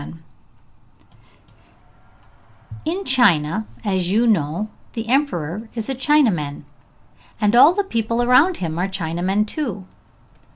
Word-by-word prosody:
_] 155 - -10 2.7
In 365 +5 -3
China, 210 - +2 0.2
as 185 -3 -1
you 225 +4 +2
know, 180 -2 0 0.3
the 225 -1 -5
Emperor 220 - -1
is 225 0 -4
a - - 0
Chinaman, 240 - +1 0.8
and 210 +1 +2
all 270 +6 +8
the 405 +2 0
people 230 - -1
around 270 +9 +4
him 165 -1 -4
are 185 - 0
Chinamen 190 +2 -1
too. 210 - -5
215 Hz, 115 wpm, -20 LUFS, 175-255 Hz, 2.7 s, all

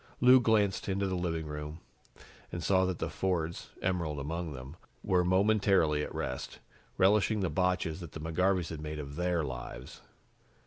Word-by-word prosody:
Lou 130 +1 +8
glanced 105 -5 +2
into 100 +1 0
the 95 - -1
living 85 -3 -2
room 75 +1 -6 0.7
and 85 - -4
saw 95 -1 +3
that 95 -2 -2
the - - -2
Fords, 85 -3 -2
Emerald 85 -6 -1
among 80 +3 -3
them, 65 +2 -8 0.3
were 90 -1 +3
momentarily 95 -4 +3
at - - -4
rest, 65 - -4 0.4
relishing 105 +2 +3
the 95 -4 0
botches 90 -1 0
that 85 -4 -9
the - - -6
McGarveys 90 +2 0
had 80 -2 -6
made 75 0 -5
of 70 -1 -6
their 90 -1 0
lives. 60 -1 -7
85 Hz, 165 wpm, -31 LUFS, 75-95 Hz, 0.7 s, Lou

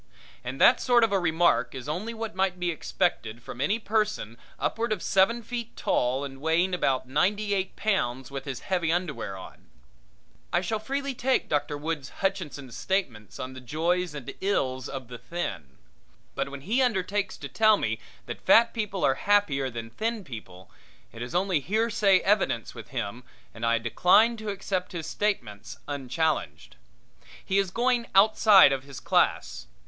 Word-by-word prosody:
And 130 +2 -5
that 245 - +6
sort 245 -2 +4
of 225 - +3
a 195 - +2
remark 170 -3 +2
is 130 +1 -7
only 180 +10 -3
what 225 -1 -5
might 190 -1 0
be 175 -1 0
expected 120 - -2
from 125 - -7
any 200 +10 +2
person 210 - -1 0.2
upward 230 0 -1
of 210 -5 -1
seven 210 +5 +3
feet 235 0 -6
tall 125 +3 0
and 135 -1 -8
weighing 165 +4 +2
about 135 -7 0
ninety 200 +9 +1
eight 190 -1 -2
pounds 135 - -1
with 135 -1 -6
his 135 -3 -5
heavy 175 -4 0
underwear 165 - -2
on. 95 - -12 0.8
I 175 - +2
shall 215 +4 -2
freely 275 +4 -3
take 260 +1 0
Dr. 145 0 -1
Woods 150 -3 -4
Hutchinson's 160 - -3
statements 120 - -2
on 130 0 -5
the 130 - -9
joys 165 +5 -1
and 140 -4 -6
ills 130 -10 -1
of 130 -3 -6
the 125 0 -9
thin. 75 - -5 0.6
But 135 - -2
when 140 0 -8
he 225 - +1
undertakes 200 -4 0
to 140 - -7
tell 215 - +4
me 110 - -2 0.3
that 120 - -7
fat 230 +1 +5
people 210 -4 -1
are 135 - +4 0.2
happier 145 -11 +3
than 115 -1 -7
thin 225 - -2
people, 95 - -10 0.4
it 115 - -10
is 120 +4 -5
only 185 -2 +2
hearsay 210 - +2
evidence 195 - +1
with - - -10
him 110 +5 -5 0.3
and 115 0 0
decline 215 +6 +4
to 215 -1 -5
accept 195 -1 -3
his 165 -3 -4
statements 120 - -3
unchallenged. 140 - -2 0.7
He 195 +1 +2
is 195 -2 0
going 240 +3 +1
outside 200 -4 +7
of 135 -1 -3
his 140 -1 -9
class. - - 0
175 Hz, 165 wpm, -27 LUFS, 130-205 Hz, 0.8 s, outside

